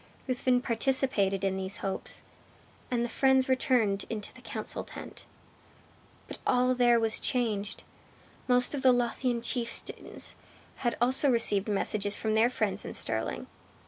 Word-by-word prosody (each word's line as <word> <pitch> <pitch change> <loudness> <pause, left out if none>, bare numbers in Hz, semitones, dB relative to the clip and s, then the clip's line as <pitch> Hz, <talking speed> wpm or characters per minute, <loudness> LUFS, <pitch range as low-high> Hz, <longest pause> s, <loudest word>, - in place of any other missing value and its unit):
Ruthven 255 -1 +1
participated 230 -6 +1
in 190 -1 0
these 190 +3 -4
hopes, 195 - -4 0.7
and 240 -1 0
the - - -2
friends 265 +2 +3
returned 245 -6 +2
into 210 -2 -5
the - - -14
council - - -5
tent. - - -10 1.0
But - - -8
all 250 0 +3
there 240 -1 +4
was 225 -1 +1
changed. 215 -5 -1 0.6
Most 250 +1 +3
of 285 - -2
the 260 - +6
Lothian 240 0 0
chieftains 235 -1 -2 0.4
had 240 -2 -1
also 260 +4 +3
received 210 -5 +2
messages 205 0 0
from 220 -1 -1
their 220 +2 +4
friends 250 - -1
in - - -5
Stirling. - - -2
240 Hz, 140 wpm, -29 LUFS, 210-255 Hz, 1.0 s, the